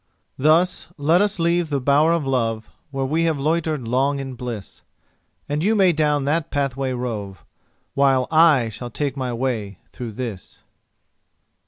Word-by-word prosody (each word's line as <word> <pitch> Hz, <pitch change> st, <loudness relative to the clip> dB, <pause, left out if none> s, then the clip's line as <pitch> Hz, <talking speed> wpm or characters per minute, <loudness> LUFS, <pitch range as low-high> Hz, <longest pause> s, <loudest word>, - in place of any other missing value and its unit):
Thus 160 Hz, +6 st, +2 dB
let 160 Hz, +5 st, +3 dB
us 205 Hz, 0 st, 0 dB
leave 170 Hz, -1 st, +1 dB
the 140 Hz, -2 st, 0 dB
bower 145 Hz, +5 st, +3 dB
of 170 Hz, -4 st, 0 dB
love, 115 Hz, -4 st, -1 dB, 0.2 s
Where 135 Hz, -1 st, -2 dB
we 160 Hz, +5 st, +1 dB
have 160 Hz, -3 st, 0 dB
loitered 155 Hz, -3 st, -1 dB
long 135 Hz, +4 st, +1 dB
in 135 Hz, -1 st, -5 dB
bliss; 120 Hz, -5 st, -7 dB, 0.7 s
And 150 Hz, +2 st, -1 dB
you 215 Hz, +4 st, +3 dB
may 190 Hz, -4 st, +4 dB
down 150 Hz, -2 st, +1 dB
that 155 Hz, +2 st, 0 dB
pathway 135 Hz, -2 st, -1 dB
rove, 105 Hz, -, -5 dB, 0.5 s
While 135 Hz, -2 st, +3 dB
I 155 Hz, -7 st, +5 dB
shall 120 Hz, +3 st, -7 dB
take 140 Hz, +2 st, -3 dB
my 130 Hz, -2 st, -3 dB
way 115 Hz, -6 st, -3 dB
through 120 Hz, -3 st, -7 dB
this. 110 Hz, -5 st, -7 dB
140 Hz, 155 wpm, -22 LUFS, 125-155 Hz, 0.7 s, I